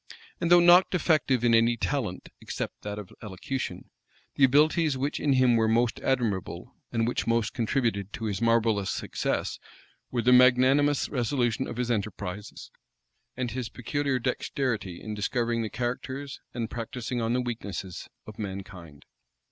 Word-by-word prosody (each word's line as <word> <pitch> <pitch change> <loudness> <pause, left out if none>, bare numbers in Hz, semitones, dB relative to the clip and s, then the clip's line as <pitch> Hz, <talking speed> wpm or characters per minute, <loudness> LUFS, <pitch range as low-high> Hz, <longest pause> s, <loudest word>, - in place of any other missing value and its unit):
And 170 - 0
though 175 0 +8
not 175 +2 +7
defective 155 -8 +1
in 120 -1 +4
any 115 +1 +4
talent, 115 -7 -3
except - - -5
that 105 0 -5
of 105 -3 -8
elocution, 105 -1 -5 0.4
the 140 - +1
abilities 150 +2 +4
which 140 +3 -2
in 145 -2 +2
him 130 -2 +4
were 110 -1 +3
most 115 +1 +1
admirable, 115 -8 -2 0.2
and 115 -1 0
which 120 - -2
most 115 -1 +1
contributed 115 -4 -1
to 115 - -5
his 100 -3 -2
marvellous 115 -4 +2
success, - - -2 0.5
were 120 -2 -1
the 125 +2 +5
magnanimous 130 +3 +5
resolution 125 -1 0
of 120 - -6
his 125 -1 -1
enterprises, 100 -2 -4 0.7
and 125 -2 -2
his 125 -1 -4
peculiar 135 +4 -1
dexterity 125 -6 -2
in 110 - -6
discovering 115 +2 -1
the 110 - -3
characters, 130 +5 -4
and 120 -2 -4
practising 120 +1 -4
on 115 +1 0
the 125 - +1
weaknesses, 100 -6 -5 0.2
of 110 0 -11
mankind. 95 -7 -8
120 Hz, 150 wpm, -27 LUFS, 110-130 Hz, 0.7 s, though